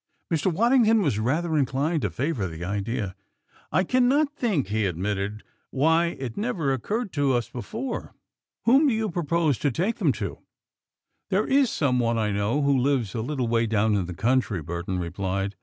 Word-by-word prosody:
Mr. 165 Hz, +4 st, +1 dB
Waddington 225 Hz, +2 st, +4 dB
was 135 Hz, -, 0 dB
rather 155 Hz, +8 st, 0 dB
inclined 145 Hz, +3 st, +1 dB
to 105 Hz, -, 0 dB
favor 120 Hz, -, -2 dB
the 85 Hz, +1 st, -6 dB
idea. 100 Hz, +1 st, -2 dB, 0.6 s
"I 185 Hz, -, +3 dB
cannot 265 Hz, -, +2 dB
think," 190 Hz, -, 0 dB
he 105 Hz, -1 st, +1 dB
admitted, 100 Hz, +4 st, -3 dB, 0.3 s
"why 160 Hz, +5 st, +2 dB
it 125 Hz, -4 st, -5 dB
never 185 Hz, -, -1 dB
occurred 205 Hz, -, -3 dB
to 145 Hz, -3 st, +2 dB
us 120 Hz, -2 st, 0 dB
before. 225 Hz, -, -5 dB, 0.5 s
Whom 270 Hz, +6 st, +5 dB
do 250 Hz, -, +2 dB
you 220 Hz, -3 st, -1 dB
propose 165 Hz, -4 st, 0 dB
to 145 Hz, -, +1 dB
take 180 Hz, -, -1 dB
them -, -, +2 dB
to?" -, -, -5 dB, 0.9 s
"There -, -, +2 dB
is 270 Hz, -2 st, +3 dB
some 130 Hz, -8 st, +1 dB
one 115 Hz, -1 st, +1 dB
I 105 Hz, -2 st, 0 dB
know 105 Hz, +8 st, 0 dB
who 140 Hz, 0 st, +3 dB
lives 130 Hz, -6 st, +1 dB
a 115 Hz, -, -2 dB
little 130 Hz, 0 st, -2 dB
way 115 Hz, 0 st, +1 dB
down 110 Hz, 0 st, +2 dB
in 95 Hz, -4 st, 0 dB
the 90 Hz, -, -6 dB
country," 115 Hz, -1 st, +1 dB
Burton 85 Hz, +3 st, -4 dB
replied. 95 Hz, +3 st, -3 dB
130 Hz, 175 wpm, -25 LUFS, 105-175 Hz, 0.9 s, Whom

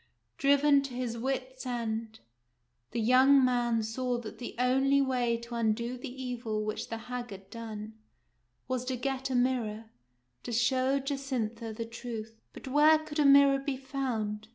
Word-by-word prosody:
Driven 280 Hz, 0 st, +5 dB
to 275 Hz, -3 st, -6 dB
his 245 Hz, -2 st, -3 dB
wits' 260 Hz, +1 st, -3 dB
end, 225 Hz, -3 st, -4 dB, 0.7 s
the -, -, -3 dB
young 260 Hz, +4 st, +6 dB
man 240 Hz, -2 st, +1 dB
saw 245 Hz, +3 st, -2 dB
that 235 Hz, -2 st, -8 dB
the 245 Hz, -, -6 dB
only 265 Hz, +3 st, +3 dB
way 250 Hz, -3 st, +1 dB
to 235 Hz, +1 st, -10 dB
undo 235 Hz, +1 st, 0 dB
the 250 Hz, -, -7 dB
evil 230 Hz, -4 st, -3 dB
which 215 Hz, 0 st, -4 dB
the 225 Hz, -, -3 dB
hag 245 Hz, +1 st, -6 dB
had 195 Hz, -1 st, -11 dB
done 220 Hz, -2 st, -7 dB, 0.7 s
was 255 Hz, -1 st, -1 dB
to 260 Hz, 0 st, -1 dB
get 265 Hz, +1 st, -2 dB
a 260 Hz, -, -1 dB
mirror, 230 Hz, -3 st, 0 dB, 0.5 s
to 245 Hz, -, -6 dB
show 255 Hz, +3 st, +2 dB
Jacintha 260 Hz, -5 st, -3 dB
the 230 Hz, +1 st, -4 dB
truth. 225 Hz, -1 st, -7 dB
But -, -, -11 dB
where 300 Hz, +4 st, +6 dB
could 310 Hz, -1 st, -6 dB
a 295 Hz, -, +4 dB
mirror 280 Hz, 0 st, +7 dB
be 275 Hz, -1 st, -3 dB
found 235 Hz, -6 st, -3 dB
245 Hz, 160 wpm, -30 LUFS, 230-270 Hz, 0.7 s, mirror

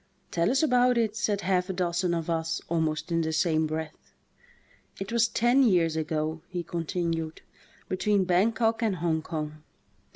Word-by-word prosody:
"Tell 170 Hz, 0 st, +1 dB
us 270 Hz, +5 st, +2 dB
about 250 Hz, -3 st, +4 dB
it," 220 Hz, -2 st, +1 dB
said 210 Hz, -2 st, 0 dB
half 185 Hz, -1 st, 0 dB
a -, -, -1 dB
dozen 175 Hz, -1 st, 0 dB
of 165 Hz, -1 st, -3 dB
us 165 Hz, 0 st, -1 dB
almost 160 Hz, 0 st, -1 dB
in 165 Hz, 0 st, +2 dB
the 160 Hz, 0 st, -1 dB
same 160 Hz, -1 st, +1 dB
breath. 155 Hz, 0 st, -6 dB, 0.8 s
"It 195 Hz, +2 st, -5 dB
was 235 Hz, 0 st, +3 dB
ten 240 Hz, +4 st, +3 dB
years 175 Hz, -9 st, +3 dB
ago," 155 Hz, 0 st, -2 dB
he 175 Hz, -1 st, -4 dB
continued, 165 Hz, -1 st, -3 dB, 0.4 s
"between 190 Hz, +1 st, +1 dB
Bankok 225 Hz, +5 st, +2 dB
and 215 Hz, -4 st, +1 dB
Hong 165 Hz, -2 st, 0 dB
Kong. 155 Hz, -1 st, -5 dB
175 Hz, 160 wpm, -27 LUFS, 160-210 Hz, 0.8 s, about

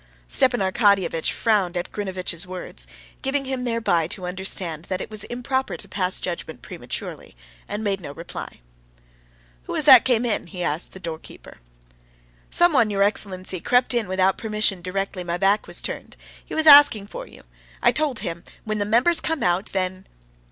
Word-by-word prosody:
Stepan 255 Hz, -4 st, +3 dB
Arkadyevitch 190 Hz, -4 st, +2 dB
frowned 200 Hz, -6 st, +1 dB
at 175 Hz, -, -4 dB
Grinevitch's 185 Hz, -3 st, -4 dB
words, 185 Hz, 0 st, -6 dB, 0.3 s
giving 275 Hz, 0 st, -1 dB
him 260 Hz, -1 st, -3 dB
thereby 225 Hz, -9 st, +1 dB
to 180 Hz, +1 st, -6 dB
understand 180 Hz, -3 st, -2 dB
that 185 Hz, 0 st, -3 dB
it -, -, -7 dB
was 215 Hz, -1 st, -1 dB
improper 260 Hz, +2 st, -2 dB
to -, -, -8 dB
pass 185 Hz, -2 st, 0 dB
judgment 175 Hz, -2 st, -5 dB
prematurely, -, -, -7 dB, 0.3 s
and 210 Hz, +1 st, -4 dB
made 200 Hz, -2 st, 0 dB
him 175 Hz, -, -11 dB
no -, -, -6 dB
reply. 165 Hz, -, -8 dB, 1.0 s
"Who -, -, -5 dB
was -, -, -1 dB
that -, -, +9 dB
came 245 Hz, -2 st, +2 dB
in?" 220 Hz, -6 st, -1 dB
he 180 Hz, 0 st, -5 dB
asked 155 Hz, +1 st, -2 dB
the 190 Hz, -, -10 dB
doorkeeper. 165 Hz, -3 st, -9 dB, 0.9 s
"Someone, 310 Hz, -11 st, +3 dB
your 200 Hz, -1 st, +2 dB
excellency, 185 Hz, -3 st, -1 dB
crept 250 Hz, +7 st, +2 dB
in 235 Hz, -4 st, 0 dB
without 190 Hz, 0 st, +1 dB
permission 210 Hz, -4 st, 0 dB
directly 185 Hz, +1 st, -3 dB
my 175 Hz, 0 st, -2 dB
back 195 Hz, +3 st, +2 dB
was -, -, -2 dB
turned. -, -, -6 dB, 0.3 s
He -, -, -8 dB
was 315 Hz, -, 0 dB
asking 285 Hz, -9 st, +8 dB
for -, -, -8 dB
you. -, -, -16 dB, 0.4 s
I -, -, +6 dB
told 300 Hz, -6 st, 0 dB
him: 170 Hz, 0 st, -5 dB, 0.2 s
when 215 Hz, -1 st, -3 dB
the 205 Hz, -, 0 dB
members 245 Hz, +11 st, +3 dB
come 320 Hz, -2 st, -2 dB
out, 180 Hz, +2 st, +1 dB
then...." 185 Hz, 0 st, -3 dB
195 Hz, 175 wpm, -23 LUFS, 180-235 Hz, 1.0 s, that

